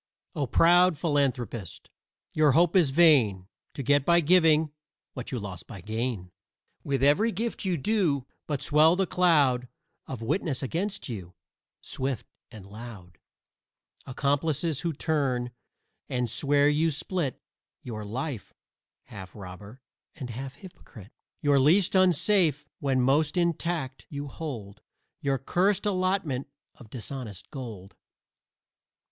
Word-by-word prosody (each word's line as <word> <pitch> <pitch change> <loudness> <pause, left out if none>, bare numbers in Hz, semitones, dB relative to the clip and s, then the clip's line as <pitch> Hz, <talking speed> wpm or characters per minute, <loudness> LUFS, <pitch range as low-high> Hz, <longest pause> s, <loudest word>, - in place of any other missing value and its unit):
O 140 -3 -2
proud 175 +5 +5
philanthropist, 125 - -2 0.4
your 150 -3 +4
hope 170 +4 +3
is 175 -7 +5
vain 135 - +4 0.3
To 140 - -4
get 145 +1 +3
by 170 +3 +4
giving 160 -2 +4 0.4
what 125 -3 -7
you 130 - -2
lost 95 -6 -7
by 100 - -9
gain. 110 -2 -3 0.5
With 135 -2 -1
every 185 +12 +4
gift 225 +2 -3
you 180 -3 0
do 160 - 0 0.2
but 145 -3 -2
swell 155 +3 +5
the 190 +1 +1
cloud 145 -9 +3 0.4
Of 130 -4 -6
witnesses 145 - -1
against 185 +9 -3
you, 95 -7 -7 0.5
swift 130 -4 -3 0.2
and 105 -4 -12
loud 100 -6 -11 0.9
Accomplices 145 +3 0
who 170 - -1
turn 135 -5 -1 0.6
and 125 -2 -1
swear 145 +5 +2
you 150 +2 +2
split 155 -2 -3 0.4
Your 110 -3 -6
life: 120 +2 -5 0.5
half 95 -2 -11
robber 100 +5 -11 0.3
and 130 -7 -6
half 130 +3 -7
hypocrite. 125 - -14 0.3
You're 145 -1 +4
least 165 +8 +4
unsafe 175 -4 +3
when 135 -2 +1
most 150 +5 +2
intact 170 -5 -1
you 145 0 -5
hold 120 -10 -7 0.4
Your 140 -1 0
curst 190 - +1
allotment 185 -9 0 0.3
of 120 -8 -16
dishonest 120 -4 -7
gold. 110 -9 -8
140 Hz, 125 wpm, -27 LUFS, 120-165 Hz, 0.9 s, proud